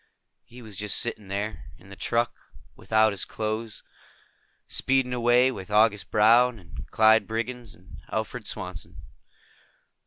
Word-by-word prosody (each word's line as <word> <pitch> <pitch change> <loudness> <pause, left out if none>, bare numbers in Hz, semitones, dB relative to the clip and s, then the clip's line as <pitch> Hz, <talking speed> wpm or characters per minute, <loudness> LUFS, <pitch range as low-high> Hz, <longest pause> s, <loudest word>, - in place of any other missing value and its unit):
He 120 +1 -14
was 110 -3 -10
just 105 -1 +1
sitting 110 -4 -1
there, 100 +2 -4
in 100 - -17
the - - -9
truck, 120 +3 -1 0.4
without 110 -1 +2
his 95 - -4
clothes, 110 0 -4 0.8
speeding 130 -1 0
away 125 +1 +3
with 95 -6 -8
August 105 -3 +2
Brown 115 +3 +4
and 90 -4 -11
Clyde 110 -1 +4
Briggs 115 0 -5
and 90 0 -15
Alfred - - -4
Swanson. 85 -2 -6
110 Hz, 130 wpm, -26 LUFS, 100-120 Hz, 0.8 s, Brown